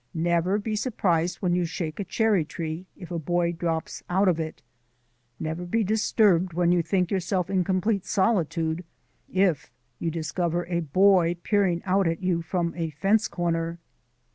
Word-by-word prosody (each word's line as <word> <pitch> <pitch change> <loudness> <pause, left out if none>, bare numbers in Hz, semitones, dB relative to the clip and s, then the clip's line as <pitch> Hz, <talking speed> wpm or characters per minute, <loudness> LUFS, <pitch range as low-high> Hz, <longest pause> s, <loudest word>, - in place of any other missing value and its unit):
Never 170 +3 +1
be 215 +1 -2
surprised 180 -7 0
when 175 -1 +2
you 180 0 +2
shake 165 -1 -4
a - - 0
cherry 205 -1 +2
tree 160 +3 -5
if 180 -1 -10
a 170 - -2
boy 175 +2 0
drops 165 -1 -3
out 190 +3 +2
of 170 -3 +2
it; 160 -1 -5 0.8
never 160 +2 -3
be 220 +6 0
disturbed 200 -4 +2
when 175 +1 +2
you 175 -1 +3
think 180 +2 0
yourself 185 -1 -1
in 185 -2 +2
complete 190 +2 0
solitude 170 -4 +1 0.5
if 185 -6 +1 0.3
you 165 - -1
discover 170 +2 -2
a 170 0 -1
boy 175 +2 +4
peering 190 -5 +1
out 195 0 +2
at 165 +3 -2
you 175 -2 +1
from 170 +1 -2
a 165 -2 -2
fence 195 +9 +2
corner. 165 -1 -2
175 Hz, 165 wpm, -26 LUFS, 165-190 Hz, 0.8 s, boy